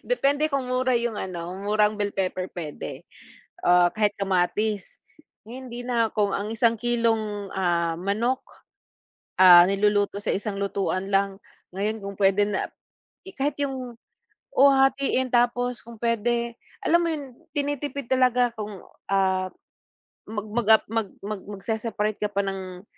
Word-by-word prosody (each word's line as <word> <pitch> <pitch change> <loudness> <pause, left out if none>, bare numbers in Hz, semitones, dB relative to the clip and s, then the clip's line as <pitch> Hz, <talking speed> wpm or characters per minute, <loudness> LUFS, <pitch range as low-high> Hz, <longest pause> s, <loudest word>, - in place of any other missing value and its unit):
Depende 300 - +1
kung 275 -3 -1
mura 255 -1 +2
'yung 235 -3 -2
ano, 175 -2 -5
murang 210 +1 +1
bell 205 -1 -2
pepper 185 -1 -1
puwede, 155 -4 -7 0.6
ah, 175 0 +4
kahit 210 -1 +1
kamatis. 195 +2 -1 0.4
Ngayon 250 +4 -9
hindi 240 0 -7
na, 240 -2 +1
kung 205 -2 +2
ang 200 +1 -2
isang 225 +1 +1
kilong, 225 -4 0
ah, 170 -3 0
manok, 225 +7 0 1.0
ah, 175 -1 +10
niluluto 205 +1 +1
sa - - -1
isang 200 0 -2
lutuan 195 -1 -2
lang, 195 0 0 0.3
ngayon 210 +3 -1
kung 200 -1 -7
puwede 195 +1 +3
na 205 - -2 0.7
kahit 285 +1 -1
'yung, 255 -4 -4 0.6
oo 280 +1 +7
hahatiin 270 -1 +2
tapos 245 0 +1
kung 230 -1 -12
puwede, 235 +1 0 0.3
alam 340 +1 +4
mo 340 - 0
'yun 285 -5 -5 0.2
tinitipid 285 -2 -3
talaga 250 -2 +3
kung, 210 -3 -7 0.3
ah, 190 -1 +1 0.8
mag 210 -1 -4
mag, 235 -1 -1
ah, 220 - +7
mag 225 -2 0 0.2
mag 205 -1 -4
magseseparate 215 +1 -3
ka 210 - -1
pa 200 0 0
ng 185 -1 -6
215 Hz, 140 wpm, -25 LUFS, 195-245 Hz, 1.0 s, ah